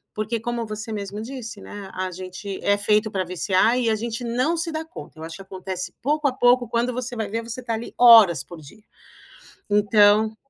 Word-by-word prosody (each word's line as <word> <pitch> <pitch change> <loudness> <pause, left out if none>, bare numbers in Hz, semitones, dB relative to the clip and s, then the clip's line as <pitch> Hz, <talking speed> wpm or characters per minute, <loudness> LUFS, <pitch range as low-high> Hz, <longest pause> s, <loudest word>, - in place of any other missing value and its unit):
Porque 215 +2 -2
como 235 +1 -3
você 215 +1 -6
mesmo 205 0 -5
disse, 230 -2 -7
né, 200 -2 -9
a 185 0 -3
gente 185 +2 -7
é 200 - +3
feito 210 +1 +2
pra 190 -2 -1
viciar 185 +6 +1
e 235 -2 +1
a 220 - +2
gente 230 +2 -4
não 250 +8 0
se 330 0 -2
dá 315 0 -3
conta. 320 - -12
Eu - - -8
acho 160 0 -7
que - - -11
acontece 185 -1 -6
pouco 295 +2 +1
a 265 - 0
pouco 245 -1 +3
quando 235 +2 0
você 245 0 -5
vai 220 -2 -3
ver 225 +2 -3
você 235 +2 -7
está 235 -2 -3
ali 225 +2 -7
horas 220 - +8
por 175 - -12
dia, 180 +9 -15 0.9
então 210 +1 +4
220 Hz, 210 wpm, -23 LUFS, 195-240 Hz, 0.9 s, horas